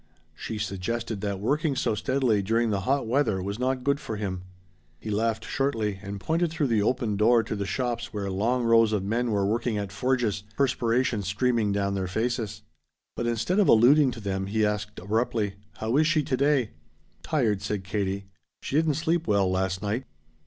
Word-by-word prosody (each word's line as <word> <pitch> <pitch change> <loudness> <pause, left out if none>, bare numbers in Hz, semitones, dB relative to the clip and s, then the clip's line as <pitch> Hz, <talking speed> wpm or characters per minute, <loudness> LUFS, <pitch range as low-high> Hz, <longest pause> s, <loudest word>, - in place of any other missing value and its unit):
She 110 +7 -6
suggested 105 +2 -3
that 100 -2 -2
working 145 - 0
so 125 - 0
steadily 120 -1 +1
during 115 +3 +1
the 100 - 0
hot 140 -1 +2
weather 115 -4 +1
was 100 +4 -4
not 130 0 0
good 140 +1 +1
for 115 -7 -5
him. 95 -3 -3 0.6
He 110 - -5
laughed 110 +1 0
shortly 110 -8 -1
and 100 -1 -6
pointed 165 - 0
through 155 -4 -1
the 110 -3 +2
open 115 -2 0
door 115 +2 +4
to 110 - -4
the 100 -1 -3
shops 120 -2 -2
where 100 -2 -3
long 120 +6 0
rows 115 -1 +4
of 100 -3 0
men 115 +4 0
were 100 -2 +1
working 115 +2 0
at 100 -1 -3
forges 110 -1 0 0.2
perspiration 125 -3 +1
streaming 110 +2 +1
down 100 0 0
their 95 -1 -2
faces. 110 +2 -2 0.5
But 120 - -2
instead 120 - 0
of 205 - +4
alluding 130 +5 +6
to 115 - -8
them 95 -2 -3
he 110 +2 +1
asked 105 0 -2
abruptly: 105 0 -1 0.2
"How 110 +3 -1
is 155 0 +4
she 155 -2 +2
today?" 135 -3 +1 0.5
"Tired," 110 -10 0
said 100 -1 -3
Katie. 100 0 -2 0.4
"She 140 - -1
didn't 155 -2 +2
sleep 165 +2 0
well 100 -3 +2
last 95 +1 -1
night." 110 +6 -2
110 Hz, 185 wpm, -26 LUFS, 100-125 Hz, 0.6 s, alluding